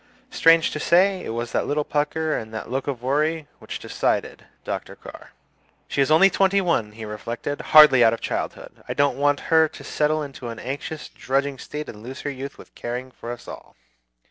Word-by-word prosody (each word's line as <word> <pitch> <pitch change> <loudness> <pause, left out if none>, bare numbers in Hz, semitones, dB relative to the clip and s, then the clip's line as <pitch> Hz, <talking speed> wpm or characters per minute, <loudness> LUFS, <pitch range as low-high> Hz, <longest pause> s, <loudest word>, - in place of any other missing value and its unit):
Strange 165 0 +5
to 150 - -4
say, 185 +4 +3
it - - -6
was 115 +1 -3
that - - -1
little 150 +1 0
pucker 155 +2 -1
and 110 -1 -5
the 110 - -6
look 135 +2 -3
of 125 -4 -4
worry 150 +3 0
which - - -6
decided - - -2 0.2
Dr. - - -5
Carr. - - -12 0.6
"She 140 - 0
is 135 - +2
only 160 +5 +7
twenty 195 +1 +3
one," 165 - 0
he 110 0 -8
reflected; 115 +6 -5
"hardly 150 -5 +8
out 115 - +6
of 115 - -3
childhood. - - -5
I - - -4
don't 145 -1 +1
want 145 0 +2
her 160 0 +6
to - - -12
settle 155 +1 0
into 135 -3 -8
an 115 - -7
anxious, 140 +5 -5
drudging 135 0 -2
state 150 0 -6
and 105 - -10
lose 130 +4 -8
her 145 - -3
youth 140 +1 -7
with - - -15
caring 125 +2 -5
for 120 - -8
us 120 - -9
all. - - -10
140 Hz, 200 wpm, -23 LUFS, 120-155 Hz, 0.6 s, hardly